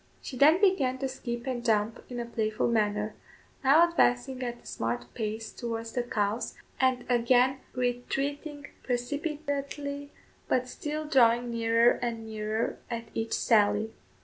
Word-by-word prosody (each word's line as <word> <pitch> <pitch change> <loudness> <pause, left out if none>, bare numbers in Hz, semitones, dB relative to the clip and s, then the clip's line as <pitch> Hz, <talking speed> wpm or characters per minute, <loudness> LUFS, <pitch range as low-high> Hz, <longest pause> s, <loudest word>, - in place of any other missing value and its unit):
She 260 - -7
then 305 +7 +6
began 315 -11 +3
to 270 0 -2
skip 240 -2 -5
and 250 -3 -3
jump 220 -1 +1
in 245 -1 -5
a 240 - -2
playful 220 -2 -1
manner; 210 -2 +1 0.5
now 305 +6 +6
advancing 260 -5 +1
at 240 -1 -4
a - - -25
smart 120 +1 -3
pace 220 0 -4
towards 230 -1 -4
the 245 - 0
cows, 215 -1 -1 0.2
and 260 -2 +2
again 250 +2 +3
retreating 275 +4 -2 0.2
precipitately, 285 +2 -3 0.4
but 255 0 +1
still 305 +4 -4
drawing 240 -4 +4
nearer 230 +1 +3
and 230 -2 -3
nearer 215 0 -2
at 230 -1 -5
each 225 0 -2
sally. 210 0 +3
245 Hz, 140 wpm, -29 LUFS, 225-270 Hz, 0.5 s, then